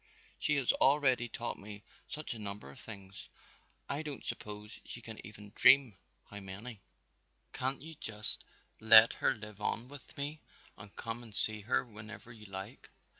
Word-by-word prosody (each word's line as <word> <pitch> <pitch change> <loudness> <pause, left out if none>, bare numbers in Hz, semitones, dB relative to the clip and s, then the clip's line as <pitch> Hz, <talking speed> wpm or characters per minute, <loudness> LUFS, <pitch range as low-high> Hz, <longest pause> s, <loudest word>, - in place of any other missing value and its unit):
She 145 - +1
has 135 -4 +2
already 130 -4 +3
taught 120 +1 -5
me 105 0 -10 0.3
such 155 -3 -4
a 115 - -9
number 100 -8 0
of - - -14
things, 100 -3 -10 0.6
I 140 +2 -2
don't 150 -3 -7
suppose 105 0 -6
she - - -9
can 115 -2 -10
even 105 -1 -11
dream 130 -5 +6 0.4
how 100 - -6
many! 100 +3 -8 0.7
Can't 130 +2 -3
you 160 +1 -8
just 110 -7 0 0.4
let 110 0 +9
her 135 - +1
live 105 -1 -11
on 115 +4 -2
with 145 -1 -12
me 145 +2 -4 0.3
and 100 +1 -13
come 115 +1 -5
and 110 -3 -10
see 110 -1 +6
her 115 +5 0
whenever 110 +1 -11
you 105 -2 -13
like?" 95 0 -8
110 Hz, 165 wpm, -33 LUFS, 105-130 Hz, 0.7 s, let